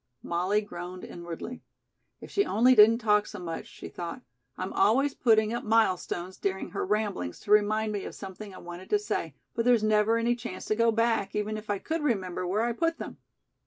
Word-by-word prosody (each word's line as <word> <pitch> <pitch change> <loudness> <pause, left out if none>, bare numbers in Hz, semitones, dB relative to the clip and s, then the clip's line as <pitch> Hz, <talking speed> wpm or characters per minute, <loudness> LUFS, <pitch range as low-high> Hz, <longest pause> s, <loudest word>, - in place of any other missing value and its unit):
Molly 185 +5 +1
groaned 180 -2 -8
inwardly. 175 +8 -7 0.6
"If - - -10
she 400 - +3
only 250 - +4
didn't 225 0 +7
talk 210 -3 +2
so 210 - -8
much," 170 -3 -5
she - - -10
thought. 170 -1 -7 0.3
"I'm 185 +1 -4
always 270 +6 +3
putting 220 -2 +3
up 240 - -3
milestones 185 -4 0
during 190 -1 -2
her - - -2
ramblings 200 - -1
to 205 - -6
remind 215 +1 +3
me 205 -2 -3
of - - -7
something 195 +1 -8
I 185 - -11
wanted 175 +1 -9
to 420 - +4
say, 415 - -3 0.2
but 230 - 0
there's 240 -2 +4
never 215 +1 +3
any 235 +1 +1
chance 240 0 -7
to 215 - 0
go 230 +1 +3
back, 225 -2 +1
even 210 +1 -1
if 215 0 -8
I 205 - +1
could 325 +10 -3
remember 185 -10 -1
where 205 +5 +1
I 240 - +1
put 330 +7 0
them." - - -7
210 Hz, 200 wpm, -28 LUFS, 190-230 Hz, 0.6 s, didn't